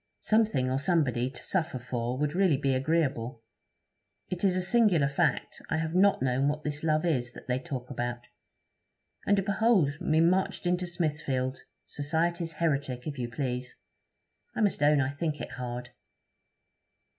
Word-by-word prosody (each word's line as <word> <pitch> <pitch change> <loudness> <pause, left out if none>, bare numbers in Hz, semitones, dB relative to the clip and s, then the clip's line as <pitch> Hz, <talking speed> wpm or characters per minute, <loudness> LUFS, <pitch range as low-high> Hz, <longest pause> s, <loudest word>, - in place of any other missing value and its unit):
Something 215 - +2
or 130 - +1
somebody 140 -6 +1
to 130 - -11
suffer 160 -8 -1
for 125 0 -3
would 150 +1 0
really 180 -5 +3
be 135 -1 +1
agreeable. 130 -5 0 0.9
It 180 +1 -4
is 190 -2 +3
a 185 - +1
singular 190 -7 +3
fact, 145 - 0
I - - +1
have 160 0 -2
not 190 -5 +4
known 130 +2 +1
what 150 +1 -1
this 150 +1 -4
love 155 0 +2
is, 125 -7 0
that - - -12
they 125 0 0
talk 130 -2 -6
about. 120 -1 -3 1.1
And 195 -1 +3
behold 200 -8 +2
me 155 0 +2
marched 180 +3 +2
into 180 0 0
Smithfield! 145 -6 -2 0.2
society's 165 +3 -1
heretic, 140 -6 -1
if 145 -3 -5
you 120 -1 -2
please. 125 0 -3 0.8
I - - -1
must 205 -7 +1
own 145 0 +5
I 135 0 0
think 150 +1 -3
it - - -6
hard.' 125 0 -5
150 Hz, 155 wpm, -29 LUFS, 130-170 Hz, 1.1 s, own